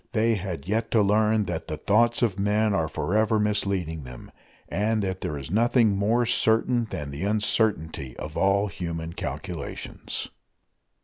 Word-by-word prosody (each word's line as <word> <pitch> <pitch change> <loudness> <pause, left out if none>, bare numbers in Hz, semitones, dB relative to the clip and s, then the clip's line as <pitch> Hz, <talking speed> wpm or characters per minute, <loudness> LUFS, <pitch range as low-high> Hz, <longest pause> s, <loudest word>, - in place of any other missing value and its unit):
They 115 0 +3
had 90 -6 -4
yet 110 +3 0
to 110 -3 +5
learn 105 +1 +3
that 85 -3 -4
the 75 - -4
thoughts 115 +7 +2
of 100 -5 +1
men 105 +1 +2
are 80 -5 +1
forever 110 +7 +1
misleading 100 -6 0
them, 65 -1 -11 0.4
and 105 +1 0
that 95 -1 -3
there 75 - -3
is 70 +3 -7
nothing 115 0 +3
more 110 +5 +2
certain 115 +1 +2
than 75 -2 -5
the 70 +5 -5
uncertainty 100 - 0
of 75 +1 -7
all 100 +2 +3
human 85 -3 -5
calculations. 85 -4 -5
100 Hz, 150 wpm, -26 LUFS, 85-110 Hz, 0.4 s, to